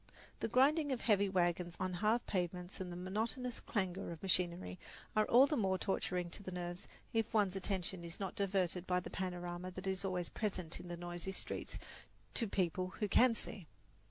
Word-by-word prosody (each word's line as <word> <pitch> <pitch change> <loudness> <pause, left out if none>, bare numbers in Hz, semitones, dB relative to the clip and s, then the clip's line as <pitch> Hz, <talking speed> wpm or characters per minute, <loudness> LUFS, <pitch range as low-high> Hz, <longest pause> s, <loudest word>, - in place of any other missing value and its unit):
The - - 0
grinding 285 +5 +4
of 255 - -1
heavy 200 -3 +4
wagons 175 -1 +1
on 185 -1 -1
hard 215 +6 +2
pavements 180 0 -2
and 180 -1 -4
the - - -5
monotonous 225 +7 -1
clangour 190 -3 -1
of 170 0 -7
machinery 175 - +1 0.4
are 215 0 +4
all 250 +3 +8
the 300 - 0
more 190 -6 +2
torturing 180 -2 -1
to - - -6
the 190 - -6
nerves 175 0 -4 0.3
if 225 -1 +1
one's 200 -3 +4
attention 190 -2 -2
is 170 0 -7
not 195 -2 -2
diverted 185 -2 0
by 180 0 +3
the 180 - -7
panorama 180 -1 -3
that 185 +1 -7
is 190 0 -1
always 180 -3 -1
present 190 -6 -2
in 180 - -9
the 175 0 -4
noisy 175 +1 -4
streets - - -3 0.6
to 230 - +1
people 185 -2 +1
who 210 - +1
can 240 +3 +6
see. 195 -5 -2
185 Hz, 185 wpm, -37 LUFS, 175-210 Hz, 0.6 s, all